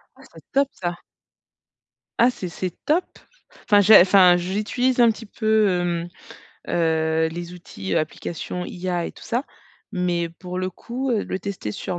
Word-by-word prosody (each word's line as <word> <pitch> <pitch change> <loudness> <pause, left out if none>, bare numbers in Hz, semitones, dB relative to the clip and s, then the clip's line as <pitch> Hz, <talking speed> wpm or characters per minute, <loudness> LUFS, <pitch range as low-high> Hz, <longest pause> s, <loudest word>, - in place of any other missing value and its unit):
Ah - - -19
c'est - - -13
top 275 0 +3
ça! 175 -1 -4 1.3
Ah 240 - +6
c'est 185 -7 -5
c'est 180 +2 -4
top! 330 +5 +2 0.6
Enfin, 205 -1 +5
j'ai 205 +1 +8
enfin, 185 -1 +6
j'utilise 215 +8 -1
un 235 -1 +7
petit 225 +1 -4
peu, 215 0 +2
hem, 175 -1 -1 0.6
heu, 160 -1 +1
les 175 +1 -6
outils, 95 - -5
applications 170 +3 -3
IA 175 -1 -3
et - - -5
tout - - -14
ça. 240 +3 -1 0.5
Mais 175 -3 -1
pour 180 +2 -8
le 185 0 -2
coup, 250 +8 -4
heu, 225 -4 0
le 185 - -3
tester 185 - -5
sur 175 - -4
180 Hz, 160 wpm, -23 LUFS, 175-215 Hz, 1.3 s, j'ai